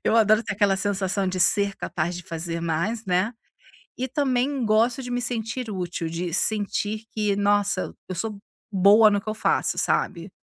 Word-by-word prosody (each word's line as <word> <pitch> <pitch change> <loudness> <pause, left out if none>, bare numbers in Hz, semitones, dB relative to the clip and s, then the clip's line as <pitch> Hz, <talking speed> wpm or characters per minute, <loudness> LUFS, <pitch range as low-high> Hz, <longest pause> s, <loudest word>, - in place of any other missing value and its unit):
eu - - +3
adoro 215 0 +4
ter - - -4
aquela 200 -1 +2
sensação 195 -1 -1
de 185 0 -2
ser 200 +2 +4
capaz 170 +2 -3
de 180 - -7
fazer 165 0 -4
mais, 170 +8 -2
né, 185 +5 +1 0.7
e 260 - -1
também 265 -1 0
gosto 225 +4 +2
de 245 - -7
me 245 0 -1
sentir 235 0 -3
útil, 180 -3 -4
de 170 0 -4
sentir 215 +1 0
que, 210 -2 0
nossa, 205 -1 +1
eu 185 - -4
sou 210 +3 -4 0.3
boa 205 +3 +6
no 205 -1 +1
que 215 - -10
eu 215 - -3
faço, 220 - 0
sabe? 175 0 -1
205 Hz, 180 wpm, -24 LUFS, 185-225 Hz, 0.7 s, boa